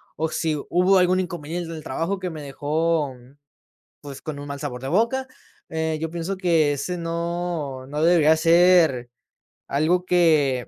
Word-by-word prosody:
o 160 +1 -1
si 160 -1 -1
hubo 180 +2 +4
algún 180 +1 +3
inconveniente 175 -2 -4
en 165 - -6
el 155 - -9
trabajo 165 +9 -2
que 185 -1 -4
me 160 -3 -8
dejó, 150 +1 -1 0.9
pues, 140 -2 -10
con 155 -2 -6
un 145 - -7
mal 140 0 -5
sabor 125 -4 -5
de 135 - -5
boca, 230 - +1 0.4
eh, 160 -1 -2
yo 160 0 -3
pienso 175 +3 -4
que 165 -5 +2
ese 180 +6 -3
no 170 -5 -3
no 150 +2 -3
debería 160 -2 +5
ser 165 -6 +4 0.6
algo 160 +6 +1
que, 155 -8 +2
160 Hz, 165 wpm, -23 LUFS, 145-175 Hz, 0.9 s, debería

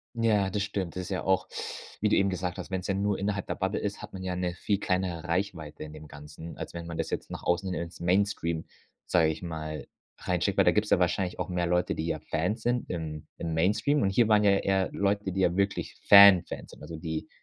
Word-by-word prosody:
Ja, 110 -4 +2
das 100 +1 -1
stimmt. 100 -4 -3
Das 95 - -2
ist 90 - -7
ja 95 - -2
auch 95 -1 +1 0.5
wie 105 - +2
du - - +3
eben 100 0 +3
gesagt 90 -1 -3
hast, - - -7
wenn‘s 95 -1 -3
ja 100 - 0
nur 100 +1 0
innerhalb 100 -1 -2
der - - -2
Bubble - - -1
ist, - - -3
hat - - -9
man 95 -1 -7
ja 90 -1 -2
‘ne 90 -1 -2
viel 100 +1 -1
kleinere 90 -4 -1
Reichweite 85 -4 -3
in 75 - -9
dem 75 0 -11
Ganzen, 75 +3 -10
als - - -6
wenn 85 0 -6
man 85 - -6
das - - -2
jetzt - - -4
nach - - -6
außen 90 +2 0
hin 85 - -2
ins 85 0 -9
Mainstream, 85 -2 +1 0.4
sage 85 -3 +3
ich 80 - -3
mal, 80 -2 -5 0.3
reinschickt, 90 +2 0
weil - - +6
da - - +5
gibt's 105 0 0
ja - - +5
wahrscheinlich 90 +1 0
auch - - -2
mehr 90 -1 -1
Leute, 90 +1 +1
die 80 - -3
ja 80 - -1
Fans 90 +8 -2
sind 120 0 0
im 80 -3 -5
im 80 -1 -3
Mainstream 105 - +2
und 95 - +2
hier 115 +3 +3
waren 105 -1 +5
ja 100 -1 +5
eher 95 -1 +1
Leute, 100 0 0
die 95 - -2
ja 90 -1 +2
wirklich 100 0 -1
Fan-Fans 100 -3 +7
sind, - - -14
also 85 - -7
die 80 -1 -4
90 Hz, 245 wpm, -28 LUFS, 85-100 Hz, 0.5 s, Fan-Fans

